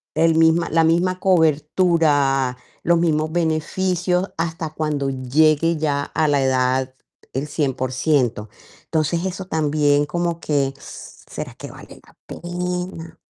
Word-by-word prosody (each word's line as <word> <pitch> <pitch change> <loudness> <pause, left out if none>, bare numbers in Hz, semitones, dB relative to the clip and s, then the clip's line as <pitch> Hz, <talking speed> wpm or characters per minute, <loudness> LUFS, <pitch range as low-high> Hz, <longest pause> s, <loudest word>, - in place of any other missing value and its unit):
el 165 0 +3
misma 165 +1 +3
la 165 0 +3
misma 180 +3 +1
cobertura, 150 -6 +2 0.3
los 170 0 +3
mismos 155 -2 +1
beneficios, 180 +3 0
hasta 165 -1 -3
cuando 150 -3 -2
llegue 155 +5 +2
ya 145 -2 0
a 155 +1 -1
la 145 -2 +2
edad 130 0 +1 0.4
el 135 +3 -3
100%. 130 -5 -1 0.4
Entonces, 165 +3 -1
eso 185 0 -4
también, 145 -3 +1
como 170 +2 -2
que, 140 -2 0
¿será - - -9
que - - -9
vale - - -13
la - - -22
pena? 180 -1 -5
155 Hz, 120 wpm, -21 LUFS, 145-170 Hz, 0.4 s, el